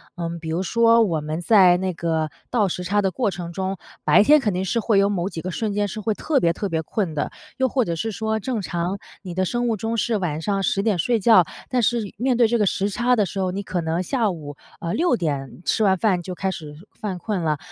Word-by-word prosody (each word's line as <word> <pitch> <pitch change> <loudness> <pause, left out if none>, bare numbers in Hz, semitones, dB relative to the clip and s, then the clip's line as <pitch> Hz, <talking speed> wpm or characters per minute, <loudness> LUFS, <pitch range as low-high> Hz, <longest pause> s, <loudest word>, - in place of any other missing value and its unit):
嗯， 170 -1 -4
比 160 - -8
如 170 +4 -1
说 230 +3 +4
我 170 -7 0
们 155 +2 -4
在 185 -2 +6
那 185 +1 -1
个 160 -2 -1 0.2
倒 210 -5 +2
时 180 +1 -4
差 205 +3 +2
的 190 -2 0
过 240 -1 0
程 175 -2 -6
中， 190 +2 -3 0.3
白 205 - +6
天 300 +7 +6
肯 210 -8 0
定 180 +1 -1
是 190 +5 0
会 220 -2 +2
有 200 0 +4
某 185 -3 -1
几 165 - -6
个 185 - -4
瞬 210 +3 -2
间 205 0 +1
是 215 - -6
会 215 +1 0
特 285 +6 0
别 170 -7 +2
特 200 +3 -3
别 160 -2 -1
困 175 +1 -2
的， 150 - -2 0.3
又 260 - +2
或 255 0 +1
者 170 - -2
是 225 - -2
说 220 +1 -1
正 230 -1 -2
常 175 +2 -2 0.2
你 185 -3 -7
的 185 +2 0
生 240 +6 -1
物 230 - +1
钟 225 +3 -3
是 230 +1 +1
晚 160 -5 -2
上 195 +3 -1
10 195 - +1
点 205 -2 +1
睡 230 +7 +1
觉， 205 -3 +6 0.2
但 250 -1 +1
是 225 -3 0
面 245 +2 +1
对 235 - +5
这 235 +2 +1
个 210 - +2
时 195 +1 0
差 240 +4 +1
的 210 - +3
时 195 +1 -4
候， 185 -1 0
你 200 +2 -4
可 185 -2 -2
能 165 +2 -1
下 220 +2 0
午， 150 -4 -8 0.2
呃， 170 +1 -3
6 330 -7 +2
点 145 - -3
吃 220 - +1
完 190 -2 +4
饭 185 -2 +1
就 185 +1 -6
开 190 +2 -1
始 155 -5 -8 0.3
犯 200 -4 -3
困 205 -1 -2
了。 155 -2 0
195 Hz, 275 characters per minute, -23 LUFS, 175-220 Hz, 0.3 s, 在